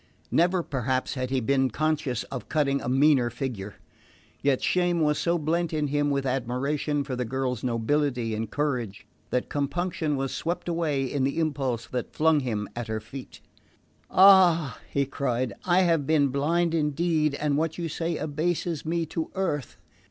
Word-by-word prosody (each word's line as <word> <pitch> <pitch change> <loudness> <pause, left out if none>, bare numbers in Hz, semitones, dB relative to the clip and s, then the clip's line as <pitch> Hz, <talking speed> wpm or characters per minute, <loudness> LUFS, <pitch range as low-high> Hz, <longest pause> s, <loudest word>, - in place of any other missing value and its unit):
Never 175 +1 +3
perhaps 130 -2 -1
had 130 -2 -3
he 130 0 +1
been 135 +2 +2
conscious 150 -2 -1
of 130 -3 -6
cutting 140 -3 +1
a - - -3
meaner 135 -2 +4
figure; 115 -5 -5 0.7
yet 140 -2 +1
shame 175 -1 +2
was 150 -2 +2
so 170 0 +1
blent 165 +2 -1
in 150 -2 0
him 145 0 +1
with 140 -1 0
admiration 135 +3 -1
for 130 - -4
the 125 - -1
girl's 125 0 -2
nobility 125 0 0
and 110 0 -3
courage, 125 -9 -2 0.2
that 125 - -1
compunction 155 +1 -1
was 135 0 -2
swept 170 +2 -3
away 165 -5 0
in 130 +1 -1
the 135 +3 0
impulse 135 -7 -1
that 125 -2 -5
flung 160 -1 +4
him 110 -6 -2
at 120 -1 -4
her 110 0 -2
feet. 125 +5 -10 0.7
"Ah," 180 -7 +6
he 140 0 +1
cried, 130 -2 -2
"I 180 +1 +4
have 165 -6 +2
been 150 -3 +3
blind 165 +5 +1
indeed, 155 -1 +1
and 145 0 0
what 160 +1 -1
you 170 -1 -2
say 165 +1 -2
abases 160 +1 -2
me 165 +1 -1
to 160 +1 -4
earth. 145 - -2
145 Hz, 165 wpm, -26 LUFS, 130-160 Hz, 0.7 s, Ah